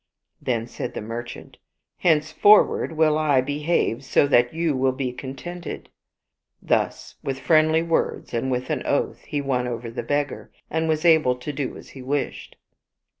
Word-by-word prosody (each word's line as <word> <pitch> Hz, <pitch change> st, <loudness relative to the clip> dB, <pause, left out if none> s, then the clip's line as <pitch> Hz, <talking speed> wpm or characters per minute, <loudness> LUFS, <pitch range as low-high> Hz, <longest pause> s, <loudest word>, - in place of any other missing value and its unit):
Then 115 Hz, -3 st, -1 dB
said 120 Hz, -, -6 dB
the -, -, -3 dB
merchant, 115 Hz, +2 st, -7 dB, 0.4 s
"Henceforward 160 Hz, +4 st, +4 dB
will 155 Hz, -1 st, +3 dB
I 145 Hz, -4 st, +3 dB
behave 145 Hz, -2 st, 0 dB
so 135 Hz, -, +3 dB
that 120 Hz, -2 st, +4 dB
you 165 Hz, -2 st, 0 dB
will 130 Hz, 0 st, +1 dB
be 130 Hz, -1 st, -3 dB
contented." 140 Hz, +8 st, -7 dB, 0.7 s
Thus -, -, -1 dB
with 135 Hz, -1 st, -3 dB
friendly 155 Hz, +2 st, +3 dB
words 165 Hz, -5 st, -1 dB
and 120 Hz, +3 st, -1 dB
with 125 Hz, 0 st, -2 dB
an -, -, -1 dB
oath -, -, 0 dB
he 145 Hz, -, -2 dB
won 125 Hz, -3 st, -1 dB
over 115 Hz, -1 st, -5 dB
the 115 Hz, -, -4 dB
beggar^ 145 Hz, -1 st, -2 dB, 0.2 s
and 160 Hz, +1 st, 0 dB
was 155 Hz, +1 st, 0 dB
able 160 Hz, -7 st, +5 dB
to 125 Hz, +4 st, -6 dB
do 135 Hz, -2 st, -4 dB
as -, -, -13 dB
he 135 Hz, -, -11 dB
wished. 140 Hz, +2 st, -3 dB
140 Hz, 160 wpm, -23 LUFS, 125-155 Hz, 0.7 s, able